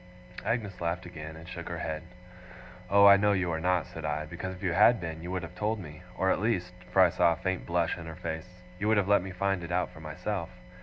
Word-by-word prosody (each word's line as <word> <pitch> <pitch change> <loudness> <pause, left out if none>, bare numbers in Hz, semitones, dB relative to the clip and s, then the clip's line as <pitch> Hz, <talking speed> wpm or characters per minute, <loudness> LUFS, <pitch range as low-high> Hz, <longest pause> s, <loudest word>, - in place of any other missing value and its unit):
Agnes 105 -6 -2
laughed 85 +1 -2
again, 80 -3 -8
and 80 +1 -11
shook 85 -2 -7
her 85 - -4
head. 80 -1 -3 0.9
'Oh, 100 0 +7
I 100 0 +10
know 105 +1 +3
you 95 -3 0
are 80 - -1
not!' 90 0 +1
said 80 - -9
I, 75 0 -1
'because 90 +3 -6
if 90 - -13
you 90 -3 +1
had 115 +6 +6
been 80 -2 -5
you 90 - -6
would 90 -1 -2
have 85 +1 -8
told 105 +4 -1
me. 75 -3 -9 0.2
Or 95 0 +2
at - - +1
least' 90 -5 0 0.2
for 95 - +6
I 90 - +4
saw 85 -1 +4
a - - -4
faint 95 +2 -3
blush 85 0 0
in 80 - -8
her 80 - -7
face, 90 +1 -6 0.2
'you 105 - -1
would 110 0 +4
have 100 -2 +2
let 100 -1 +5
me 95 - -6
find 95 0 -1
it 85 - -6
out 90 +1 0
for - - -13
myself. 85 +4 -4
90 Hz, 260 wpm, -29 LUFS, 85-95 Hz, 0.9 s, I